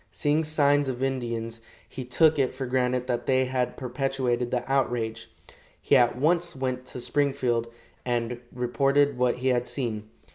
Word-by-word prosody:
Seeing 150 +1 0
signs 145 -2 +2
of 130 0 -3
Indians, 115 -3 -3 0.3
he 130 - -7
took 150 +5 +3
it 130 -1 +1
for 130 0 -3
granted 125 0 0
that 120 -2 -2
they 130 -1 +3
had 130 -1 -2
perpetrated 125 -1 -1
the 125 -1 -1
outrage. 120 -4 -1 0.5
He - - +2
at 120 -2 +4
once 170 +4 +1
went 130 -1 -3
to 125 - -7
Springfield, 125 -3 0 0.4
and 120 -1 -1
reported 140 +3 +2
what 125 -1 +2
he 130 +1 -1
had 125 -1 +1
seen. 110 -5 -4
130 Hz, 155 wpm, -26 LUFS, 120-135 Hz, 0.5 s, at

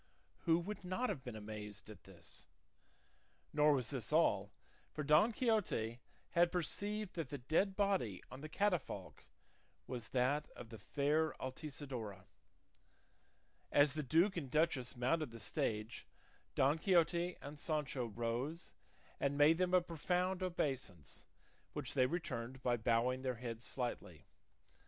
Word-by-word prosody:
Who 165 -1 +5
would 195 +5 -4
not 185 +8 -1
have 130 - -3
been 125 -4 -6
amazed 105 -1 -6
at 105 -4 -12
this? 85 -4 -9 1.1
Nor 150 0 +5
was 125 -5 -1
this 130 -3 -3
all, 105 -11 +3 0.4
for 150 - -3
Don 155 +10 +5
Quixote 210 - +1 0.3
had 170 0 +4
perceived 205 +4 -1
that 165 -6 -3
the 145 - -4
dead 160 +9 +1
body 190 - +1
on 130 - -8
the 155 - -6
catafalque 185 -4 -1 0.6
was 120 -3 -5
that 135 +4 +1
of 120 - -9
the 110 -2 -9
fair 150 +8 +1
Altisidora. 130 -8 -5 1.5
As 145 -1 +5
the 155 - -1
duke 165 +8 +3
and 140 -6 -3
duchess 145 -5 +1
mounted 145 +5 +1
the 115 0 -10
stage 105 +1 -2 0.5
Don 140 +4 +3
Quixote 175 -1 +3
and 145 +1 -8
Sancho 145 -6 -1
rose 120 +8 -3 0.5
and 140 0 +1
made 155 +3 +6
them 185 0 +3
a 180 - +6
profound 180 +2 0
obeisance, 135 - -2 0.5
which - - -3
they 130 - +4
returned 130 -6 -4
by 120 -1 +3
bowing 120 +2 +2
their 130 -1 -1
heads 120 0 -5
slightly. 125 -2 -4
145 Hz, 140 wpm, -38 LUFS, 120-170 Hz, 1.5 s, made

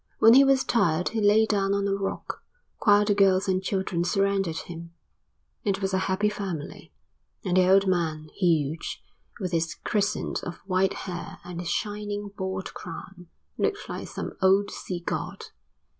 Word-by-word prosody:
When 225 +1 +7
he 270 +2 +8
was 270 -1 +4
tired 180 -7 +2
he 225 -1 -2
lay 210 +2 +5
down 200 -2 +1
on 200 0 0
a 195 - +1
rock, 195 0 -4 0.4
while 205 0 +6
the 205 - +3
girls 195 -1 +3
and 185 -1 +1
children 190 -3 -1
surrounded 195 -2 +1
him; 170 0 -9 0.7
it 200 -2 0
was 195 -1 -2
a 190 - +3
happy 190 +3 +2
family; 195 -8 -5 0.5
and 180 -1 +1
the 185 0 +5
old 195 +1 +6
man, 160 -4 -1
huge, 160 -4 0 0.4
with 185 -4 -3
his 165 -1 0
crescent 210 0 -1
of 175 - -5
white 190 0 +2
hair 175 -2 -6
and 175 -1 -7
his 175 -1 -4
shining 205 +1 -3
bald 190 -1 -4
crown, 180 +1 -9 0.3
looked 410 - -1
like - - -5
some - - -5
old 195 +2 +4
sea 180 -2 -5
god. - - -3
190 Hz, 165 wpm, -26 LUFS, 175-205 Hz, 0.7 s, he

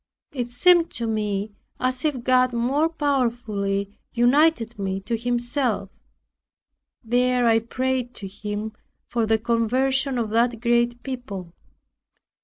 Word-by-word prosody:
It 245 -3 -3
seemed 340 +7 +4
to 235 - -3
me 210 -2 -2 0.3
as 255 0 0
if 285 -6 -1
God 255 0 +3
more 270 +7 +1
powerfully 230 -9 -1
united 240 -2 +3
me 195 -1 -2
to 210 +4 -2
Himself. 240 -3 -1 1.1
There 245 +1 +2
I 225 -1 +5
prayed 255 +1 -2
to 195 - -5
Him 210 +2 -5 0.3
for 230 -2 -1
the 220 0 +3
conversion 255 +4 +1
of 225 -3 -2
that 230 +1 +2
great 240 0 +1
people. 205 -10 -6
240 Hz, 120 wpm, -24 LUFS, 220-255 Hz, 1.1 s, I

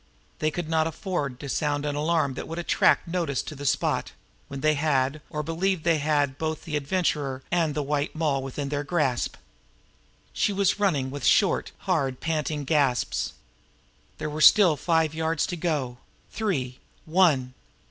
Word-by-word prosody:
They 155 - +1
could 165 +1 -4
not 160 0 +2
afford 155 -6 -3
to 140 - -6
sound 145 +1 -1
an 145 - -1
alarm 155 -2 +1
that - - -6
would 165 - -6
attract 175 - +2
notice 170 -6 -1
to - - -7
the 145 -1 -5
spot - - 0 0.3
when 140 -1 -7
they 155 +1 +3
had, 145 -1 0
or 150 0 -3
believed 165 +2 -1
they 165 -2 +3
had, 145 -2 0
both 160 -1 -3
the 155 -3 -4
Adventurer 145 -3 -1
and 165 -4 +1
the 150 - -1
White 145 +2 -1
Moll 150 -4 0
within 135 +1 -4
their 145 0 -2
grasp 140 -6 0
now. - - -25 0.9
She - - +1
was 200 +1 +1
running 150 -10 +1
now - - -8
with 145 +1 -5
short, 195 - +3
hard, 140 -9 0
panting 155 -2 -2
gasps. 140 -3 +1 0.8
There - - -4
were 155 +1 -4
still 185 -1 +7
five 160 +1 +1
yards 160 0 0
to 180 - -4
go 145 -8 -2 0.3
three 135 - -2 0.3
one! 155 -7 +3
150 Hz, 170 wpm, -26 LUFS, 140-165 Hz, 0.9 s, still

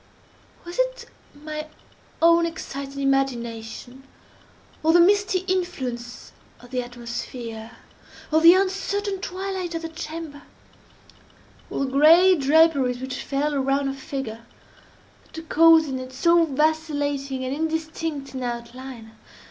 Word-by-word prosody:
Was 345 +6 -7
it - - -1 0.3
my 305 +1 -6 0.6
own 335 0 +5
excited 280 -4 -7
imagination—or 265 +3 -3
the 350 - +6
misty 380 +1 +3
influence 260 -10 -3 0.3
of 245 0 -16
the 250 -1 -1
atmosphere—or 240 +4 -6
the 335 +2 +9
uncertain 390 +1 -1
twilight 375 -2 -4
of 330 - -4
the 330 - -4
chamber—or 320 -2 -7 1.4
the 260 - -5
gray 330 +7 +7
draperies 285 -4 +3
which 260 0 -5
fell 290 +2 -1
around 275 0 0
her - - -3
figure—that 270 +5 -10
caused 325 0 +6
in 265 -2 -3
it 255 0 -8
so 335 +4 +4
vacillating 290 -3 -1
and 255 - -2
indistinct 315 -2 -3
an 260 - -5
outline? 240 -1 -7
290 Hz, 110 wpm, -24 LUFS, 260-330 Hz, 1.4 s, the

